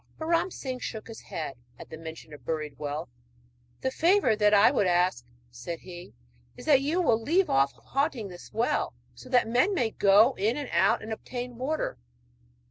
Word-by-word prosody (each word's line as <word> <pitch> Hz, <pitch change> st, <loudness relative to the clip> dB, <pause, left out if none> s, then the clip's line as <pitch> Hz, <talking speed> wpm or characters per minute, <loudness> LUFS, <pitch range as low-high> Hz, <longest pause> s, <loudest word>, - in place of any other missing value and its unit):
But 315 Hz, -, -5 dB
Ram 335 Hz, +2 st, +2 dB
Singh 260 Hz, -7 st, -5 dB
shook 220 Hz, -3 st, -6 dB
his 225 Hz, -1 st, -9 dB
head 155 Hz, -5 st, -6 dB, 0.2 s
at -, -, -12 dB
the -, -, -6 dB
mention 160 Hz, -1 st, -9 dB
of 150 Hz, -, -12 dB
buried 155 Hz, -3 st, -4 dB
wealth. 150 Hz, +1 st, -4 dB, 0.7 s
'The 260 Hz, -, -1 dB
favour 335 Hz, -, +3 dB
that 210 Hz, -1 st, +3 dB
I 205 Hz, 0 st, +6 dB
would 200 Hz, -, +2 dB
ask,' 175 Hz, -9 st, +1 dB, 0.2 s
said 125 Hz, +8 st, -7 dB
he, 175 Hz, -, -11 dB, 0.4 s
'is -, -, -10 dB
that 280 Hz, -3 st, +5 dB
you 305 Hz, +6 st, 0 dB
will 230 Hz, -7 st, +3 dB
leave 345 Hz, +10 st, +2 dB
off 135 Hz, +1 st, +3 dB
haunting 235 Hz, -, -2 dB
this 180 Hz, -2 st, -12 dB
well, 225 Hz, +3 st, 0 dB, 0.2 s
so 255 Hz, -, -13 dB
that 250 Hz, -3 st, +3 dB
men 255 Hz, -, +2 dB
may 235 Hz, -8 st, +1 dB
go 210 Hz, +7 st, +5 dB
in 220 Hz, +6 st, +1 dB
and 285 Hz, -3 st, -4 dB
out 185 Hz, +3 st, +3 dB
and 220 Hz, 0 st, -4 dB
obtain 245 Hz, +2 st, -6 dB
water.' 265 Hz, -, -2 dB
220 Hz, 190 wpm, -28 LUFS, 170-260 Hz, 0.7 s, I